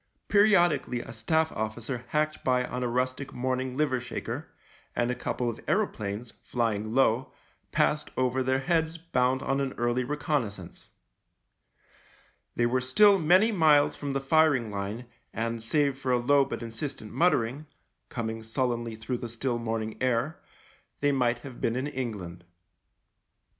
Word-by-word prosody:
Periodic 200 Hz, -4 st, +4 dB
ally 125 Hz, -, -2 dB
a -, -, -8 dB
Staff 160 Hz, +8 st, +1 dB
officer 115 Hz, +3 st, -4 dB
hacked 155 Hz, +2 st, -1 dB
by 125 Hz, -1 st, +2 dB
on 125 Hz, 0 st, -4 dB
a 125 Hz, -, 0 dB
rustic 130 Hz, +3 st, -2 dB
morn 130 Hz, +1 st, -1 dB
ing 130 Hz, 0 st, -5 dB
liver 145 Hz, -4 st, +1 dB
shaker, 125 Hz, -, -5 dB, 0.5 s
and 120 Hz, +1 st, +1 dB
a -, -, 0 dB
couple 125 Hz, 0 st, -2 dB
of 115 Hz, -, -3 dB
aeroplanes, 115 Hz, -, -1 dB
flying 110 Hz, -2 st, -1 dB
low, 130 Hz, -1 st, +3 dB, 0.4 s
passed 150 Hz, 0 st, +1 dB
over 130 Hz, 0 st, +1 dB
their 130 Hz, +1 st, +1 dB
heads 165 Hz, +1 st, 0 dB
bound 130 Hz, -5 st, 0 dB
on 135 Hz, +1 st, 0 dB
an 135 Hz, -1 st, -2 dB
early 120 Hz, +1 st, 0 dB
reconnaissance. 125 Hz, -, -3 dB, 1.7 s
They 120 Hz, -, +2 dB
were 125 Hz, +2 st, +1 dB
still 195 Hz, +11 st, +5 dB
many 185 Hz, +8 st, +5 dB
miles 155 Hz, -7 st, +4 dB
from 140 Hz, -1 st, -4 dB
the 135 Hz, -, 0 dB
firing 135 Hz, -5 st, +3 dB
line 100 Hz, +4 st, -4 dB, 0.3 s
and, 115 Hz, 0 st, -2 dB
save 140 Hz, +2 st, +1 dB
for 130 Hz, -1 st, -1 dB
a 125 Hz, -, +4 dB
low 140 Hz, +3 st, +4 dB
but 135 Hz, -, -5 dB
insistent 115 Hz, -1 st, -6 dB
muttering, 150 Hz, -4 st, +1 dB, 0.4 s
coming 115 Hz, -2 st, -4 dB
sullenly 120 Hz, 0 st, -2 dB
through 115 Hz, +3 st, -4 dB
the 120 Hz, -, -5 dB
still 120 Hz, +1 st, -2 dB
morning 110 Hz, -1 st, -3 dB
air, 130 Hz, +4 st, 0 dB, 0.6 s
they 145 Hz, 0 st, +3 dB
might 125 Hz, -3 st, +2 dB
have 130 Hz, -3 st, -9 dB
been 115 Hz, -, +1 dB
in 130 Hz, +2 st, -1 dB
England. 105 Hz, -11 st, -5 dB
125 Hz, 155 wpm, -28 LUFS, 115-145 Hz, 1.7 s, still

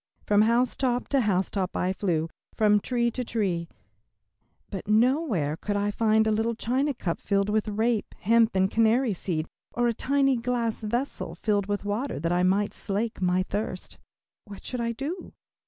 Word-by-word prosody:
From 205 Hz, 0 st, +4 dB
housetop 245 Hz, +2 st, +1 dB
to 275 Hz, -2 st, +3 dB
housetop 190 Hz, -2 st, 0 dB
I 185 Hz, +1 st, 0 dB
flew, 170 Hz, -5 st, 0 dB, 0.3 s
from 210 Hz, -1 st, +4 dB
tree 235 Hz, +2 st, 0 dB
to 250 Hz, -, -3 dB
tree, 185 Hz, -8 st, -1 dB, 1.0 s
but 200 Hz, +1 st, -6 dB
nowhere 220 Hz, -, +2 dB
could 205 Hz, +5 st, -3 dB
I 205 Hz, 0 st, 0 dB
find 220 Hz, 0 st, +3 dB
a 220 Hz, -, +2 dB
little 225 Hz, +2 st, 0 dB
china 260 Hz, +5 st, 0 dB
cup 170 Hz, -6 st, -3 dB
filled 200 Hz, 0 st, +1 dB
with 215 Hz, +1 st, +1 dB
rape, 220 Hz, +1 st, 0 dB
hemp, 230 Hz, 0 st, +3 dB
and 190 Hz, 0 st, +2 dB
canary 230 Hz, +1 st, +3 dB
seed, 170 Hz, -4 st, -2 dB, 0.3 s
or 240 Hz, 0 st, +2 dB
a 235 Hz, -, +1 dB
tiny 275 Hz, +2 st, +2 dB
glass 235 Hz, -1 st, -1 dB
vessel 235 Hz, +6 st, -3 dB
filled 205 Hz, -2 st, 0 dB
with 205 Hz, 0 st, -2 dB
water 215 Hz, -, -2 dB
that 165 Hz, +3 st, -1 dB
I 175 Hz, 0 st, +2 dB
might 195 Hz, +3 st, +2 dB
slake 215 Hz, +1 st, -3 dB
my 180 Hz, 0 st, +2 dB
thirst. 195 Hz, -1 st, -4 dB, 0.5 s
What 205 Hz, -2 st, -11 dB
should 250 Hz, -2 st, -3 dB
I 235 Hz, 0 st, 0 dB
do? 295 Hz, +10 st, -5 dB
215 Hz, 170 wpm, -27 LUFS, 195-240 Hz, 1.0 s, From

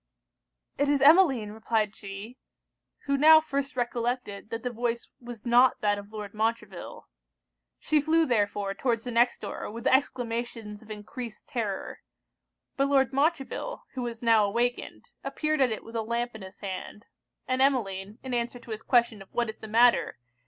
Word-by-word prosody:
'It 285 Hz, 0 st, +2 dB
is 285 Hz, -1 st, +3 dB
Emmeline,' 275 Hz, -, +5 dB
replied 220 Hz, -1 st, -1 dB
she; 205 Hz, +5 st, -9 dB, 0.7 s
who 280 Hz, -, +1 dB
now 315 Hz, +3 st, +8 dB
first 280 Hz, -2 st, -3 dB
recollected 240 Hz, -4 st, -2 dB
that 230 Hz, 0 st, -5 dB
the 250 Hz, -, -2 dB
voice 235 Hz, 0 st, -2 dB
was 240 Hz, -2 st, -10 dB
not 245 Hz, +2 st, +5 dB
that 205 Hz, -1 st, +1 dB
of 200 Hz, +1 st, -12 dB
Lord 210 Hz, -2 st, -7 dB
Montreville. 215 Hz, -3 st, -3 dB, 0.7 s
She 305 Hz, -1 st, +1 dB
flew 320 Hz, +2 st, +3 dB
therefore 205 Hz, -5 st, 0 dB
towards 230 Hz, +1 st, -1 dB
the 245 Hz, -, -5 dB
next 240 Hz, +1 st, +2 dB
door, 205 Hz, -, -5 dB
with 230 Hz, +3 st, -8 dB
exclamations 235 Hz, -5 st, -1 dB
of 220 Hz, -, -17 dB
encreased 215 Hz, +2 st, -8 dB
terror; 225 Hz, -8 st, -4 dB, 0.8 s
but 275 Hz, 0 st, +2 dB
Lord 270 Hz, -2 st, +3 dB
Montreville, 305 Hz, -, -1 dB
who 260 Hz, -, -4 dB
was 235 Hz, -1 st, -5 dB
now 225 Hz, -2 st, +5 dB
awakened, 240 Hz, +4 st, -1 dB, 0.2 s
appeared 305 Hz, -2 st, -1 dB
at 255 Hz, -3 st, +4 dB
it 220 Hz, -, -4 dB
with 225 Hz, -, -11 dB
a 225 Hz, -, 0 dB
lamp 235 Hz, +2 st, -2 dB
in 220 Hz, -, -10 dB
his 190 Hz, 0 st, -11 dB
hand; 200 Hz, +2 st, -6 dB, 0.4 s
and 255 Hz, 0 st, 0 dB
Emmeline, 210 Hz, -7 st, 0 dB
in 260 Hz, -1 st, -5 dB
answer 240 Hz, 0 st, -1 dB
to 235 Hz, -1 st, -12 dB
his 215 Hz, 0 st, -4 dB
question 235 Hz, -4 st, +2 dB
of 195 Hz, -, -14 dB
what 235 Hz, -2 st, 0 dB
is 220 Hz, -, -8 dB
the 220 Hz, -, -8 dB
matter? 235 Hz, -, +4 dB
235 Hz, 170 wpm, -28 LUFS, 215-260 Hz, 0.8 s, now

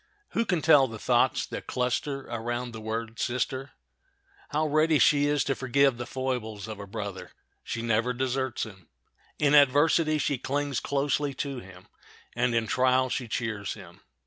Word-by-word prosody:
Who 230 Hz, -, 0 dB
can 180 Hz, -6 st, 0 dB
tell 145 Hz, -4 st, +6 dB
the 115 Hz, -2 st, -7 dB
thoughts -, -, +2 dB
that -, -, -7 dB
cluster 130 Hz, +3 st, -1 dB
around 120 Hz, 0 st, -4 dB
the 110 Hz, -1 st, -8 dB
word 115 Hz, +1 st, -4 dB
sister? 130 Hz, +2 st, -2 dB, 0.8 s
How 155 Hz, +1 st, 0 dB
ready 155 Hz, +1 st, +3 dB
she 145 Hz, 0 st, +4 dB
is 145 Hz, -1 st, +2 dB
to 135 Hz, -, 0 dB
forgive 135 Hz, 0 st, +2 dB
the 120 Hz, +1 st, -5 dB
foibles 120 Hz, -6 st, -3 dB
of 110 Hz, -2 st, -7 dB
a 100 Hz, -, -8 dB
brother! 95 Hz, -2 st, -6 dB, 0.3 s
She 115 Hz, -, -4 dB
never 115 Hz, +2 st, +1 dB
deserts 130 Hz, 0 st, -1 dB
him. 95 Hz, -5 st, -14 dB, 0.5 s
In 145 Hz, -1 st, +2 dB
adversity 150 Hz, +3 st, +5 dB
she 140 Hz, -3 st, -1 dB
clings 140 Hz, 0 st, -1 dB
closely 140 Hz, 0 st, -1 dB
to 135 Hz, -1 st, -3 dB
him, 95 Hz, -3 st, -14 dB, 0.5 s
and 120 Hz, 0 st, +1 dB
in 115 Hz, -1 st, +2 dB
trial 130 Hz, +2 st, +2 dB
she 125 Hz, -, -2 dB
cheers 110 Hz, -3 st, -3 dB
him. -, -, -13 dB
130 Hz, 165 wpm, -27 LUFS, 115-140 Hz, 0.8 s, tell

